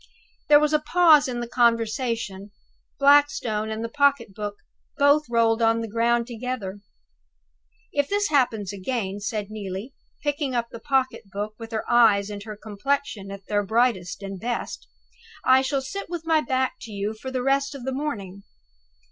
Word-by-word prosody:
There 295 -1 +8
was 300 0 +1
a 305 - +4
pause 305 -1 +5
in 240 -2 -3
the 240 - -4
conversation. 230 -4 0 0.5
Blackstone 275 -7 +3
and 220 +1 -4
the - - -2
pocket 280 -5 +2
book 205 0 -5 0.4
both 285 0 +4
rolled 230 -1 +2
on 225 0 +3
the 225 - -4
ground 235 +2 +1
together. 235 -5 -5 1.1
"If 285 -1 0
this 405 0 +1
happens 225 -9 +1
again," 200 0 -3
said 205 0 -4
Neelie, 205 +3 -6 0.3
picking 290 -3 -1
up 235 -1 -1
the 230 - -8
pocket 260 -6 -1
book, 205 +2 -4
with 225 0 -8
her 220 -1 -3
eyes 215 -4 +4
and 205 -1 -6
her 215 -2 -7
complexion 215 0 -3
at 195 0 -9
their 205 -1 +1
brightest 205 -3 0
and 195 -1 -6
best, 240 +4 -4 0.6
"I 260 0 +6
shall 270 0 -1
sit 395 +8 -6
with 345 -2 -5
my 320 -1 +3
back 260 -3 -1
to 230 - -9
you 205 +1 -3
for 220 +4 -7
the 255 -1 -2
rest 275 +1 +1
of 270 - -8
the 265 +1 -2
morning. 205 -10 -4
235 Hz, 170 wpm, -24 LUFS, 210-275 Hz, 1.1 s, There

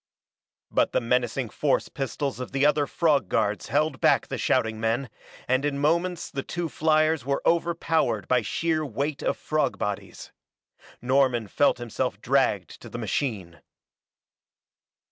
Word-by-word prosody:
But - - +2
the - - +3
menacing 120 0 0
force 145 -3 +1
pistols 135 0 -3
of 125 - -6
the 135 +1 +2
other 150 -1 +3
frog 145 - +1
guards 105 -1 0
held 145 -3 0
back - - +4
the - - -4
shouting 110 -1 +1
men 115 +4 -1 0.4
and 130 +2 +2
in 145 -1 -1
moments 170 +4 0
the 135 - -3
two 170 +3 -4
fliers 155 0 +2
were 140 +2 -1
overpowered 165 - +1
by 125 -1 +3
sheer 160 +7 -1
weight 140 +2 -3
of - - -1
frog 155 -3 -1
bodies. 105 -2 -5 0.7
Norman 130 -3 +2
felt 145 +6 +2
himself 120 -2 -3
dragged - - 0
to - - -10
the - - -6
machine. 95 - -3
140 Hz, 145 wpm, -26 LUFS, 120-155 Hz, 0.7 s, back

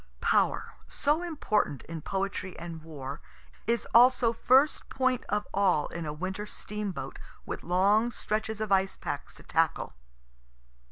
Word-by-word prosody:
(Power, - - +2
so 300 +4 +1
important 225 - 0
in 165 -1 -7
poetry 190 +1 -3
and 165 -1 -7
war, 145 -3 -7 0.5
is 235 0 +1
also 245 -1 +6
first 265 +5 +3
point 255 -2 +1
of 210 0 0
all 190 -6 +3
in 170 -2 -5
a - - -2
winter 190 +7 -4
steamboat, 210 -2 -5 0.3
with - - -5
long 200 +6 +3
stretches 220 -1 -2
of 215 -2 -3
ice 190 0 +3
packs - - -5
to - - -15
tackle.) - - 0
205 Hz, 135 wpm, -29 LUFS, 175-235 Hz, 0.5 s, also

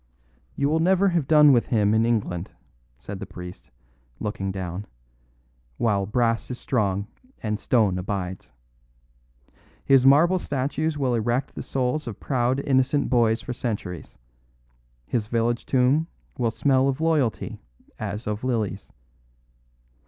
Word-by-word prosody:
"You 140 - +1
will 155 +2 +2
never 190 +3 +3
have 170 -6 0
done 150 -2 +7
with 120 - +2
him 105 -3 +2
in 110 +1 +3
England," 100 -6 -1 0.5
said 95 +8 -8
the - - -7
priest, 90 -4 -10 0.5
looking 95 -2 -3
down, 95 +1 -5 0.9
"while 100 -4 +1
brass 115 +1 0
is 125 - -4
strong 100 -5 0 0.4
and 105 -1 -1
stone 105 -7 +2
abides. 95 -1 -4 1.3
His 135 -2 +5
marble 160 +7 +5
statues 145 +2 -2
will 130 -3 0
erect 120 +4 -1
the - - -6
souls 130 +2 -2
of 110 - -6
proud, 130 0 0
innocent 135 +1 +1
boys 115 -2 +3
for 125 - -4
centuries, 100 - -5 0.9
his 105 - -2
village 115 +1 0
tomb 135 +5 +2 0.3
will 120 -2 0
smell 130 +4 +2
of 135 +1 -1
loyalty 155 -8 0 0.4
as 105 +3 -4
of 105 +2 -3
lilies. 110 -6 -2
120 Hz, 130 wpm, -24 LUFS, 105-135 Hz, 1.3 s, done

